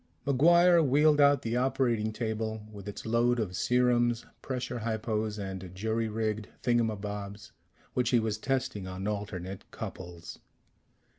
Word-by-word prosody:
MacGuire 170 Hz, +5 st, +5 dB
wheeled 150 Hz, +2 st, +4 dB
out 140 Hz, -1 st, +5 dB
the 115 Hz, +1 st, -1 dB
operating 125 Hz, -4 st, +1 dB
table, 110 Hz, -1 st, -3 dB
with 100 Hz, -1 st, -10 dB
its 105 Hz, -, -7 dB
load 120 Hz, +2 st, +2 dB
of 95 Hz, -5 st, -2 dB
serums, 120 Hz, 0 st, +2 dB, 0.2 s
pressure 125 Hz, -2 st, -3 dB
hypos 110 Hz, -1 st, -2 dB
and 95 Hz, -2 st, -5 dB
jury 110 Hz, +3 st, -1 dB
rigged 110 Hz, -1 st, -2 dB, 0.2 s
thingamabobs 105 Hz, -4 st, -1 dB, 0.4 s
which 125 Hz, -2 st, +1 dB
he 120 Hz, -, +4 dB
was 110 Hz, -1 st, -2 dB
testing 125 Hz, -7 st, -2 dB
on 95 Hz, +2 st, -5 dB
alternate 100 Hz, -3 st, -5 dB
couples. 85 Hz, -2 st, -8 dB
110 Hz, 130 wpm, -30 LUFS, 105-125 Hz, 0.4 s, MacGuire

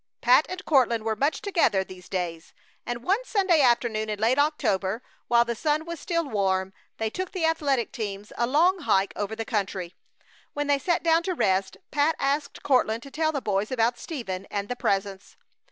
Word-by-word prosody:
Pat 255 Hz, +5 st, +5 dB
and 370 Hz, +1 st, -6 dB
Courtland 240 Hz, -6 st, +3 dB
were 220 Hz, 0 st, -1 dB
much 280 Hz, +5 st, 0 dB
together 335 Hz, -, +2 dB
these 185 Hz, -1 st, -13 dB
days, 170 Hz, -3 st, -4 dB, 0.3 s
and 240 Hz, 0 st, -4 dB
one 400 Hz, -, +1 dB
Sunday 380 Hz, -9 st, +2 dB
afternoon 235 Hz, -4 st, +2 dB
in 210 Hz, -, -2 dB
late 230 Hz, +6 st, +2 dB
October, 225 Hz, -8 st, 0 dB, 0.2 s
while 235 Hz, 0 st, +4 dB
the 235 Hz, -, -1 dB
sun 305 Hz, +6 st, 0 dB
was 335 Hz, -1 st, -6 dB
still 335 Hz, -2 st, -1 dB
warm, 190 Hz, -4 st, 0 dB, 0.2 s
they 220 Hz, -, -1 dB
took 370 Hz, +5 st, -4 dB
the 360 Hz, -4 st, 0 dB
athletic 285 Hz, -7 st, +1 dB
teams 205 Hz, -3 st, -6 dB
a 235 Hz, -, 0 dB
long 345 Hz, +8 st, +3 dB
hike 195 Hz, -, +1 dB
over 205 Hz, +1 st, -3 dB
the 225 Hz, 0 st, -4 dB
country. 195 Hz, -5 st, -2 dB, 0.6 s
When 290 Hz, 0 st, -2 dB
they 285 Hz, -1 st, +2 dB
sat 345 Hz, +5 st, 0 dB
down 330 Hz, 0 st, +4 dB
to 370 Hz, +1 st, -2 dB
rest 190 Hz, -, +1 dB
Pat 295 Hz, +2 st, +2 dB
asked 280 Hz, +1 st, -1 dB
Courtland 235 Hz, -4 st, +2 dB
to 275 Hz, -, -11 dB
tell 315 Hz, +1 st, 0 dB
the 280 Hz, -3 st, -3 dB
boys 200 Hz, 0 st, 0 dB
about 240 Hz, -1 st, +1 dB
Stephen, 195 Hz, -, -5 dB
and 200 Hz, 0 st, -3 dB
the 245 Hz, -, -2 dB
Presence. 195 Hz, -3 st, -2 dB
240 Hz, 190 wpm, -26 LUFS, 205-305 Hz, 0.6 s, Pat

